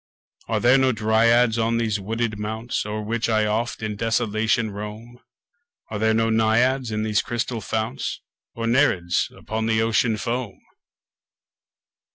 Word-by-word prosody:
Are - - 0
there 125 +3 +5
no 130 -1 +3
Dryads 115 +1 +3
on 115 +1 +1
these 110 -3 0
wooded 110 +1 -2
mounts 110 +2 -3
O'er 105 0 -3
which 115 +2 -1
I 110 -1 +2
oft 110 +2 -2
in 105 -1 -3
desolation 110 0 0
roam? 105 +4 -8 0.7
Are 105 - -3
there 110 0 +2
no 115 0 +2
Naiads 120 +4 +2
in 110 0 -2
these 105 -1 +1
crystal 120 -1 -3
founts? 110 -11 -3 0.4
Nor 115 - -3
Nereids 115 -9 +2
upon 110 0 -3
the 110 0 +2
Ocean 115 0 +1
foam? 115 -2 -3
110 Hz, 145 wpm, -23 LUFS, 110-115 Hz, 0.7 s, there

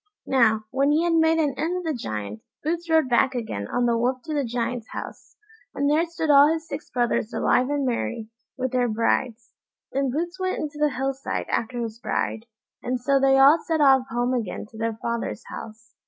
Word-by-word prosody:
Now, 220 -5 +3
when 275 +2 +2
he 305 +3 +3
had 345 -1 +1
made 325 0 +4
an 295 -4 +1
end 340 +3 0
of 360 - -4
the 320 -2 -1
Giant, 105 - -5 0.2
Boots 335 +2 -2
rode 320 -4 +4
back 255 +2 +2
again 105 - -4
on 245 - 0
the 235 -1 +2
Wolf 250 +2 0
to 315 - -5
the 290 -2 0
Giant's 235 -1 -3
house, - - -8 0.4
and 285 - 0
there 310 +4 +2
stood 325 -2 -1
all 285 +2 +7
his 325 0 -3
six 285 -1 -7
brothers 240 -2 0
alive 250 +3 +2
and 290 -1 0
merry, 220 - -3 0.3
with 260 -1 -2
their 250 -1 +1
brides. 230 +1 -1 0.4
Then 275 0 0
Boots 345 +7 -3
went 370 0 -1
into 300 -1 -5
the 300 0 +3
hill 270 0 -2
side 270 +1 -4
after 240 +1 -2
his 225 0 -6
bride, 225 0 -2 0.3
and 250 +1 -2
so 275 +3 +2
they 270 0 +4
all 280 +4 +7
set 320 -1 -1
off 265 -3 +5
home 245 +1 0
again 230 -7 -3
to 220 - -12
their 225 -1 -2
father's 235 0 -3
house. 225 +2 -10
260 Hz, 210 wpm, -24 LUFS, 235-300 Hz, 0.4 s, all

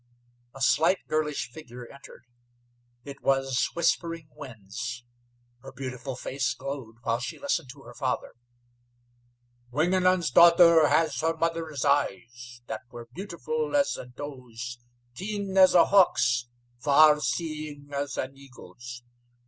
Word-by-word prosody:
A 135 - -10
slight, 165 +7 +4
girlish 150 -5 -2
figure 125 -3 -10
entered. 140 -2 -14 0.8
It 140 -1 -10
was 135 -2 +1
Whispering 165 -1 -1
Winds. 120 -1 -7 0.6
Her 135 - -11
beautiful 130 0 -6
face 130 0 -2
glowed 135 -4 -7
while 115 +1 0
she 125 - -5
listened 175 - -2
to 140 -1 -17
her 120 - -12
father. 130 -1 -3 1.4
"Wingenund's 175 +3 +2
daughter 170 0 +7
has 155 -4 +1
her 165 +1 0
mother's 165 -4 -2
eyes, 120 -2 -1
that 110 -1 -5
were 120 -1 -10
beautiful 290 - -3
as 285 -1 +2
a - - -8
doe's, 125 -3 -8 0.3
keen 200 +4 -4
as 185 -1 +6
a 175 - +7
hawk's, 125 -11 +3 0.3
far 150 +2 +6
seeing 150 -3 -4
as 140 0 -3
an 135 +1 -4
eagle's. 120 -3 -12
140 Hz, 125 wpm, -27 LUFS, 125-165 Hz, 1.4 s, daughter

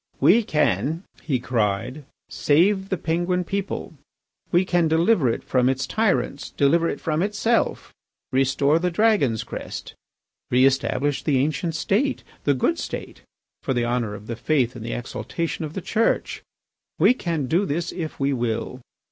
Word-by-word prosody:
"We 175 - +6
can," 160 -2 0 0.2
he 135 -5 -1
cried, 120 +3 -1 0.2
"save 190 +6 +2
the 190 - 0
Penguin 175 +3 0
people, 195 -1 -4 0.6
we 175 +2 +3
can 175 -2 +2
deliver 160 - +3
it 115 - -2
from 125 -1 +2
its 135 0 0
tyrants, 190 - 0
deliver 165 +4 +2
it - - -4
from 155 0 -1
itself, 210 +4 0 0.4
restore 135 +3 +2
the 180 +1 0
Dragon's 175 - +2
crest, - - -7 0.6
re 125 +2 +4
establish 135 +1 +1
the 145 -4 +1
ancient 155 +4 0
State, 245 - 0 0.2
the 145 - +3
good 330 - +1
State, - - -6 0.4
for 135 - -1
the 120 -1 +1
honour 120 -3 -1
of 105 +1 -11
the 115 - -4
faith 125 0 0
and 115 - -7
the 115 - -4
exaltation 160 +6 -4
of 150 - -7
the 190 - -3
Church. 225 +6 0 0.6
We - - +5
can 165 - -2
do 175 +9 +1
this 165 +4 -2
if 165 -4 -6
we 140 0 +1
will. 120 +1 -2
150 Hz, 155 wpm, -23 LUFS, 130-180 Hz, 0.6 s, We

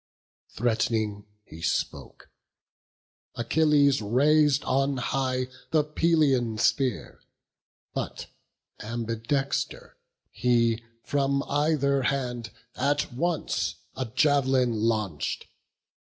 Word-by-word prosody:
Threat'ning 110 -3 -1 0.2
he 80 - -12
spoke: 85 - -3 1.0
Achilles 140 +2 +3
rais'd 145 +6 +3
on 135 +1 +1
high 130 0 -1 0.2
The 155 -2 +3
Pelian 150 -7 +2
spear; 125 +1 0 0.7
but, - - -4 0.5
ambidexter, 115 +5 -2 0.4
he 115 -2 +1 0.2
From 140 -1 0
either 145 -2 +1
hand 125 -3 -2 0.3
at 145 0 0
once 165 +5 -1 0.2
a 130 - -2
jav'lin 130 -1 +2
launch'd. 105 - -1
130 Hz, 80 wpm, -27 LUFS, 115-145 Hz, 1.0 s, Achilles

